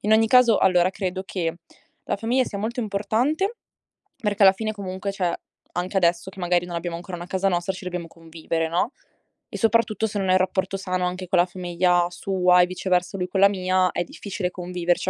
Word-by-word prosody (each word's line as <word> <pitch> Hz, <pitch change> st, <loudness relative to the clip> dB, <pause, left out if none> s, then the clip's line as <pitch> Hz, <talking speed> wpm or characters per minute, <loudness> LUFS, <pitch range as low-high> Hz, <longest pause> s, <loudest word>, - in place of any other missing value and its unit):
In 210 Hz, -, +1 dB
ogni 220 Hz, +1 st, +5 dB
caso 250 Hz, -3 st, +6 dB
allora 180 Hz, -1 st, +4 dB
credo 190 Hz, -1 st, -3 dB
che 170 Hz, -4 st, -2 dB, 0.5 s
la 205 Hz, -, -1 dB
famiglia 240 Hz, +5 st, +1 dB
sia 200 Hz, -, -6 dB
molto 230 Hz, +4 st, -3 dB
importante 240 Hz, -, 0 dB, 0.7 s
perché 210 Hz, -1 st, +1 dB
alla 190 Hz, -, +9 dB
fine 215 Hz, +2 st, -3 dB
comunque 195 Hz, -1 st, -4 dB
cioè, 185 Hz, -3 st, -1 dB, 0.4 s
anche 180 Hz, +2 st, -2 dB
adesso 175 Hz, 0 st, +2 dB
che 195 Hz, -, -13 dB
magari 175 Hz, -1 st, +1 dB
non 175 Hz, -1 st, -6 dB
abbiamo 170 Hz, 0 st, -3 dB
ancora 175 Hz, +1 st, -7 dB
una 175 Hz, +1 st, -8 dB
casa 190 Hz, +1 st, 0 dB
nostra 175 Hz, +1 st, -1 dB
ci 185 Hz, 0 st, -10 dB
dobbiamo 180 Hz, -2 st, -4 dB
convivere, 165 Hz, 0 st, -4 dB
no, 175 Hz, -, 0 dB, 0.6 s
e -, -, -6 dB
soprattutto 225 Hz, -1 st, +2 dB
se 205 Hz, -1 st, -3 dB
non 190 Hz, -1 st, -1 dB
hai 185 Hz, -, +5 dB
rapporto 190 Hz, +1 st, -1 dB
sano 185 Hz, -1 st, -2 dB
anche 180 Hz, 0 st, -4 dB
con 180 Hz, -, +2 dB
la 175 Hz, -, +5 dB
famiglia 175 Hz, -1 st, +1 dB
sua 180 Hz, 0 st, +3 dB
e -, -, +5 dB
viceversa 185 Hz, 0 st, -1 dB
lui 180 Hz, 0 st, -2 dB
con 190 Hz, +1 st, -2 dB
la 200 Hz, -, +8 dB
mia 185 Hz, -1 st, +1 dB
è -, -, -1 dB
difficile 185 Hz, +1 st, -5 dB
conviverci 180 Hz, 0 st, -1 dB
185 Hz, 205 wpm, -24 LUFS, 180-200 Hz, 0.7 s, alla